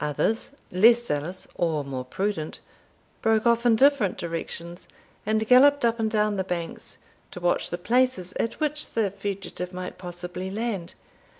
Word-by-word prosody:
Others, 215 - -1 0.2
less 230 +6 +5
zealous 160 +2 -2
or 160 -4 0
more 135 -2 -5
prudent, 175 +3 -3 0.6
broke 220 0 +2
off 235 0 +3
in 230 - +5
different 265 -5 +3
directions, 170 +1 -6 0.4
and 220 0 +1
galloped 275 +2 +6
up 230 0 +1
and 220 -1 +1
down 210 -1 +1
the 190 - 0
banks, 175 -2 -5 0.3
to - - -8
watch 175 0 +1
the 175 - -3
places 230 -2 +1
at 230 - -2
which 300 -1 -1
the 215 -4 +1
fugitive 195 -2 -5
might 180 0 -7
possibly 180 +1 -6
land. 205 -4 -3
200 Hz, 155 wpm, -26 LUFS, 175-230 Hz, 0.6 s, galloped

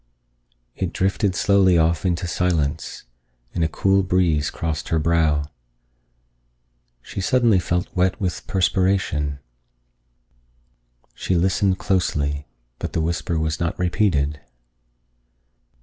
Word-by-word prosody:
It - - -3
drifted 95 0 0
slowly 95 -2 +4
off 85 +2 +2
into 85 0 -1
silence, 80 -4 -1 0.5
and 85 - 0
a - - +3
cool 95 +3 +2
breeze 90 -6 +1
crossed 80 -3 -4
her 80 - +1
brow. 80 -2 +2 1.6
She 100 - -6
suddenly 115 -1 +3
felt 90 +1 -2
wet 90 +1 +1
with 90 -3 -3
perspiration. 90 -6 +1 1.8
She 95 - -2
listened 95 +2 +2
closely, 75 -7 -1 0.3
but - - -5
the 80 - 0
whisper 85 0 -1
was 80 -1 -1
not 85 0 -2
repeated. 85 -6 0
85 Hz, 105 wpm, -22 LUFS, 80-95 Hz, 1.8 s, slowly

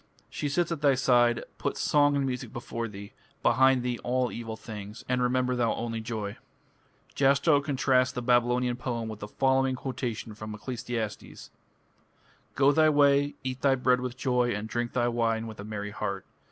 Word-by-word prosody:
She 145 - -3
sits 170 +4 0
at 165 -3 -3
thy 140 -2 +4
side. 120 -2 +3 0.2
Put - - -2
song 145 -1 +3
and 140 -1 +1
music 125 -3 -4
before 115 -1 -4
thee, 100 +2 -10 0.3
Behind 130 -1 +4
thee 125 -1 -2
all 125 0 0
evil 115 -1 -6
things, 105 -1 -9
And 125 0 0
remember 125 0 +1
thou 120 -2 +1
(only) 115 -1 -3
joy. 110 -3 -4 0.8
Jastrow 140 +2 +3
contrasts 130 -3 +2
the 125 - -5
Babylonian 120 0 +2
poem 120 -3 -3
with 110 -1 -7
the 105 - -6
following 130 +2 +1
quotation 120 -3 -4
from 110 0 -7
Ecclesiastes: 120 -1 -5 1.0
Go 140 +1 +5
thy 155 +1 +4
way, 145 -1 +3
eat 130 -1 -4
thy 135 -1 +4
bread 125 -1 +2
with 125 -1 -5
joy, 125 -3 +1
and 105 +1 -4
drink 120 +1 -3
thy 120 -1 +1
wine 115 -1 0
with 110 -2 -9
a - - -6
merry 105 -1 -5
heart.... 100 -2 -4
125 Hz, 175 wpm, -28 LUFS, 115-130 Hz, 1.0 s, Go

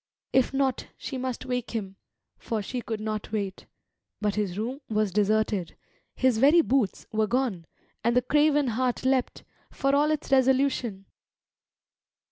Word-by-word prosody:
If 260 -2 +3
not, 270 -2 0
she 265 - -5
must 255 -1 -4
wake 250 -2 -3
him, 195 -3 -4 0.4
for 220 -3 -3
she 250 +5 -4
could 225 -2 -4
not 215 -1 -4
wait. 200 -3 -3 0.5
But 210 -1 0
his 200 -3 -2
room 250 +7 -3
was 215 -2 +1
deserted; 210 -2 +1 0.4
his 255 -4 +2
very 295 +7 +6
boots 260 - 0
were 215 -1 +1
gone; 230 -9 -1 0.4
and 235 +1 +2
the 250 - +4
craven 295 0 +3
heart 250 +2 -1
leapt, 260 -1 +1 0.3
for 275 0 0
all 295 +1 +3
its 310 -2 -2
resolution. 260 -6 +2
240 Hz, 145 wpm, -27 LUFS, 215-265 Hz, 0.5 s, very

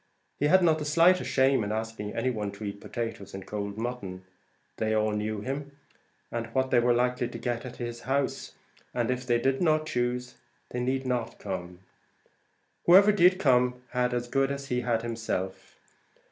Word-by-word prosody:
He 145 - +3
had 185 +3 +5
not 160 -2 +4
the 150 - -4
slightest 170 +4 +4
shame 130 -3 +3
at 105 - -3
asking 110 -1 -4
any 130 - +1
one 105 -4 -3
to 100 - -9
eat 100 0 -5
potatoes 115 -5 -5
and 95 - -7
cold 100 -1 -4
mutton. 110 -6 -5 0.5
They 110 0 0
all 110 0 +2
knew 105 0 -2
him, 140 +4 -5 0.5
and 115 -1 -3
what 130 0 +1
they 125 - +5
were 120 0 +3
likely 125 0 +1
to 120 - -7
get 120 0 -3
at 125 - -9
his 120 -1 -5
house, 135 +1 -2 0.4
and 120 0 +1
if 125 0 -3
they 120 -1 +3
did 135 +2 +1
not 155 -2 +3
choose, 125 -2 -2 0.3
they 125 - -3
need 130 +2 -1
not 120 -2 -2
come. 90 -2 -6 1.1
Whoever 195 +4 +8
did 185 -2 +5
come 125 -5 +2
had 125 0 +1
as 120 0 -2
good 135 +2 +1
as 140 0 -5
he 125 0 0
had 115 -2 0
himself. 110 -5 -4
125 Hz, 185 wpm, -28 LUFS, 110-135 Hz, 1.1 s, Whoever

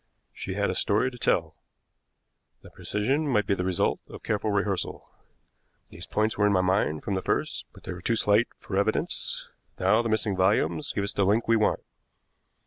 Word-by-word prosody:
She - - -5
had - - +1
a - - -2
story 110 +6 +1
to 125 - -11
tell. 80 -7 +1 1.1
The - - -13
precision 135 +9 -1
might 105 -7 +2
be 100 - +1
the 90 - -1
result 90 -2 +1
of - - -11
careful 110 0 -1
rehearsal. 100 -2 -1 0.8
These 85 +3 -11
points 110 0 0
were 105 - +5
in - - +3
my 95 - +4
mind 90 -5 +1
from 100 - -2
the 95 - -1
first, - - -2
but - - -17
they - - -5
were 90 - -9
too 115 - +1
slight 105 +2 +3
for 95 - -6
evidence. 100 +2 0 0.3
Now 110 - +4
the 115 - -2
missing 110 -2 +1
volumes 100 +10 +1
give 100 - -2
us 100 - -1
the 100 - +1
link 105 +4 +2
we 115 - +4
want. 110 -1 +2
105 Hz, 195 wpm, -27 LUFS, 95-110 Hz, 1.1 s, were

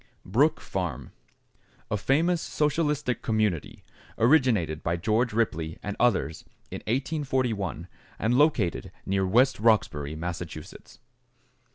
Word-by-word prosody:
=Brook 145 - +2
Farm.= 80 -9 -4 0.8
A - - +2
famous 160 - +2
socialistic 150 -3 0
community, 110 -8 -1 0.3
originated 115 - +3
by 85 +1 -1
George 110 +7 +1
Ripley 85 -8 -1
and 100 0 -4
others 110 -9 +1 0.3
in - - -5
1841 125 - -1 0.3
and 115 +3 +1
located 125 - +2
near 95 0 0
West 125 +6 +3
Roxbury, 80 -10 +2
Massachusetts. 85 +1 -7
110 Hz, 100 wpm, -27 LUFS, 85-130 Hz, 0.8 s, originated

